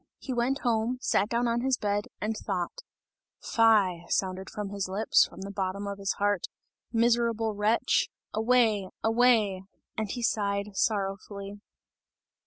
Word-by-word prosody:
He 260 - -5
went 250 +3 0
home, 235 0 0
sat 210 -4 +1
down 240 +1 +1
on 235 0 0
his 260 0 +1
bed, 205 0 -1
and 220 +1 -2
thought. 180 -4 -3 0.6
"Fie!" 200 -7 +3
sounded 190 0 -1
from 210 -1 -5
his 200 -2 -3
lips, 200 +4 +3
from - - -12
the 200 +1 -6
bottom 195 0 -3
of 200 0 -5
his 195 0 -1
heart. 205 -2 0 0.4
"Miserable 230 -1 +2
wretch! 210 +3 +2 0.2
away! 220 -3 +2
away!" 225 -4 +3 0.3
and 220 -2 -2
he 240 +4 -4
sighed 200 -2 -1
sorrowfully. 200 0 -2
210 Hz, 140 wpm, -28 LUFS, 200-230 Hz, 0.6 s, Fie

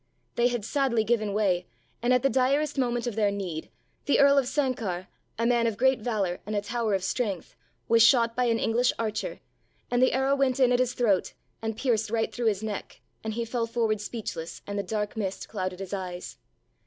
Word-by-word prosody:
They 240 0 +3
had 240 -4 -2
sadly 260 -4 +1
given 215 -2 +1
way 190 -4 +1 0.3
and 240 +2 +1
at 250 0 +3
the 275 - +4
direst 270 +5 +2
moment 240 -3 0
of 240 -4 -3
their 210 -2 +3
need 185 -6 -4 0.4
the 285 - +3
Earl 280 0 +6
of 260 - -1
Sanquhar, 230 -11 -1 0.3
a 230 - 0
man 235 -1 +3
of 220 -3 -2
great 265 +1 +3
valour 210 -6 -1
and 210 +1 -4
a 205 - +1
tower 225 -1 -1
of 190 - -2
strength, 195 -3 -2 0.3
was 230 0 +5
shot 230 -1 +5
by 250 - +2
an 230 -1 +2
English 240 +2 +2
archer 225 - -3 0.5
and 245 0 +2
the 255 - +4
arrow 265 +1 +2
went 275 -1 +1
in 255 -2 +5
at 245 - +3
his 255 -1 +1
throat 205 -7 +1 0.3
and 225 -1 -3
pierced 225 -4 +1
right 225 0 -1
through 240 -2 -1
his 210 -1 +1
neck 210 -2 -5 0.2
and 220 -1 -3
he 235 0 -1
fell 230 0 -1
forward 225 -2 0
speechless 205 -7 -6
and 200 0 -3
the - - +2
dark 210 0 -3
mist 200 -3 -3
clouded 185 -3 -4
his 195 0 -6
eyes. 180 - -5
230 Hz, 210 wpm, -27 LUFS, 205-245 Hz, 0.5 s, Earl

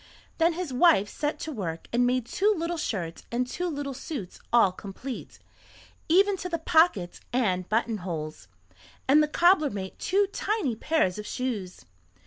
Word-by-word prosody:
Then 330 +1 +4
his 335 -5 -4
wife 255 - +5
set 295 0 -2
to 315 - -4
work 170 - -5
and 245 +1 +3
made 250 -1 +1
two 405 - +2
little 335 +1 -2
shirts 175 - -3
and 245 +1 0
two 355 +8 -3
little 285 -4 -3
suits 255 - -6
all 235 -6 +5
complete, 205 +7 -8 0.7
even 390 +4 +4
to 360 - -5
the 335 - -1
pockets 320 - +2
and 190 -8 0
buttonholes, 180 - -2 0.6
and 290 +3 +6
the 300 - +2
cobbler 340 0 +4
made 190 -4 -6
two 400 +2 +2
tiny 405 - -1
pairs 220 - +1
of 210 - -6
shoes. 215 -8 -4
255 Hz, 155 wpm, -27 LUFS, 200-330 Hz, 0.7 s, and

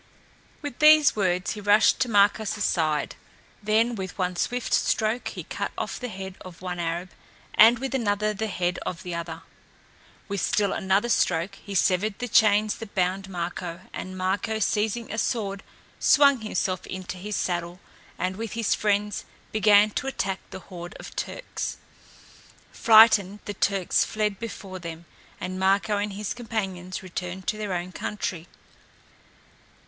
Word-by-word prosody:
With 290 -4 -6
these 305 -1 +7
words 185 -3 0
he 210 - -5
rushed 205 +1 +4
to 260 -2 +1
Marko's 205 0 +3
side; 155 -8 0 0.5
then 220 +3 +2
with 190 -4 -6
one 180 -1 -1
swift 245 +6 -2
stroke 220 +2 +1
he - - -5
cut - - -4
off - - -3
the 250 - -4
head 190 -3 -7
of 180 -2 -11
one 180 -1 -4
Arab, 170 +2 -3 0.4
and 230 +2 +7
with 270 +3 -4
another 215 -4 +1
the 220 +2 -3
head 180 -3 -1
of 180 0 -5
the 180 - -5
other. 165 -1 -5 0.8
With 200 -3 -2
still 200 +2 +1
another 195 +4 +1
stroke 180 -4 +1
he 200 0 -9
severed 195 +3 +2
the 245 - -3
chains 215 -1 +4
that 225 -3 -10
bound 190 +1 0
Marko, 175 -1 -4
and 185 0 -6
Marko, 195 +4 -1
seizing 220 +2 0
a 220 - -2
sword, 200 -5 -1 0.4
swung 280 -2 +5
himself 185 -3 -2
into 185 0 -6
his 210 +2 -4
saddle, 175 0 -2 0.4
and 185 +1 -2
with 225 -2 -5
his 230 -2 +1
friends 210 0 0 0.3
began 210 0 +5
to 270 - -3
attack 195 -8 -2
the - - -8
horde 175 -1 -9
of - - -10
Turks. - - -4 0.9
Frightened, 215 -3 +6
the 205 - -4
Turks 195 -2 +1
fled 210 -2 -1
before 195 -4 -7
them, 170 -1 -8 0.3
and 185 0 -4
Marko 200 +2 +2
and 205 0 -2
his 205 +1 -3
companions 195 -7 -4
returned 180 0 -6
to 215 - -1
their 205 -3 -2
own 175 +1 -4
country. 180 -4 -4
200 Hz, 155 wpm, -26 LUFS, 185-215 Hz, 0.9 s, these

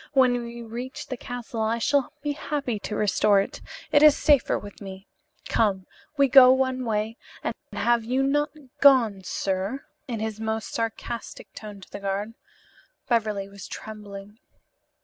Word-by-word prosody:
When 250 -3 +4
we 235 0 -7
reach 240 +3 -6
the 260 - -5
castle 245 -2 -6
I 220 +1 +1
shall 280 +3 +1
be 295 - 0
happy 280 -6 -3
to 210 - -5
restore 205 0 +3
it. 195 - -3 0.3
It 290 - +5
is 300 -1 +7
safer 290 -4 +3
with 205 0 -10
me. 195 0 -9 0.4
Come, 195 -4 +1 0.3
we 280 -1 +5
go 255 -1 +9
one 260 -1 +1
way 220 +1 -1 0.3
and - - -1 0.2
have 235 -1 +2
you 255 +4 0
not 290 +2 +1 0.3
gone, 240 -8 +5
sir?" 195 +7 -2 0.2
in 235 -4 -3
his 220 -1 -3
most 220 0 -3
sarcastic 230 +1 -5
tone 205 -2 -9
to - - -14
the - - -6
guard. 200 +2 -3 0.8
Beverly 215 -4 0
was 200 0 -10
trembling. 210 -1 -9
225 Hz, 155 wpm, -25 LUFS, 205-255 Hz, 0.8 s, go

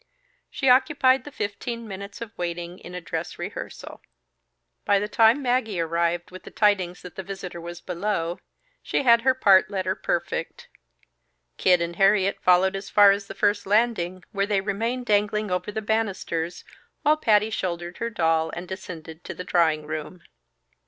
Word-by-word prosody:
She 270 - -2
occupied 260 0 +4
the 295 - -8
fifteen 230 +2 -4
minutes 200 +2 -8
of 225 -1 -7
waiting 175 0 -5
in 180 - -10
a 180 - -5
dress 165 0 -5
rehearsal. 190 +5 -7 0.8
By 205 -1 +3
the 205 +1 -1
time 225 +6 +4
Maggie 245 -6 0
arrived 170 +1 -1
with 185 - -10
the - - -11
tidings 190 -4 +1
that 180 - -9
the - - -4
visitor 190 -3 -7
was 175 0 -8
below, 175 -2 -2 0.4
she - - -1
had 235 -2 +6
her 260 +1 +3
part 195 -7 +5
letter 190 -1 -1
perfect. 485 - -3 0.9
Kid 180 -2 +4
and 170 0 -5
Harriet 195 0 +3
followed 185 +1 +4
as 195 0 -6
far 205 -1 +7
as 200 0 -2
the 195 - -8
first 205 0 +1
landing, 200 -4 +1
where 200 -1 0
they 205 -2 +2
remained 230 +6 -2
dangling 210 -1 +1
over 180 +3 -2
the 220 +1 -4
banisters, 190 -6 -2 0.4
while 300 +1 +5
Patty 220 -7 +2
shouldered 175 -3 -4
her 230 - -2
doll 165 -6 +1
and 175 +1 -6
descended 170 -3 -8
to - - -6
the 180 - -6
drawing 160 -4 +2
room. 155 +3 -6
195 Hz, 165 wpm, -25 LUFS, 175-220 Hz, 0.9 s, far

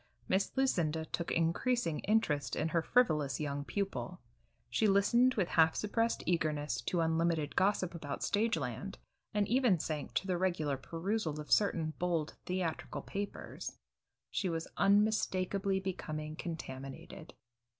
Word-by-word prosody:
Miss 190 +1 +1
Lucinda 165 - +1
took 170 +1 -3
increasing 170 - +1
interest 195 -9 +1
in 160 - 0
her 165 +1 +2
frivolous 155 - +2
young 145 -2 -2
pupil; 200 +6 -3 0.5
she 220 - +2
listened 235 +6 +4
with 190 -5 +1
half 160 -1 +4
suppressed 230 +2 0
eagerness 155 -4 0
to 175 - +1
unlimited 165 -2 +1
gossip 185 -2 +2
about 150 -4 -5
stage 220 -1 +2
land, 140 - -4 0.3
and 210 -2 +1
even 245 -6 +4
sank 150 -2 -4
to - - +1
the 180 -2 0
regular 165 -6 +1
perusal 165 +3 -2
of 150 - -8
certain 165 -6 +3
bold 170 -4 0
theatrical 180 -3 -2
papers. 200 +1 -5 0.5
She 190 - 0
was 165 -1 -2
unmistakably 200 -2 +2
becoming 155 -5 -4
contaminated. 135 -6 -7
175 Hz, 130 wpm, -33 LUFS, 155-200 Hz, 0.5 s, listened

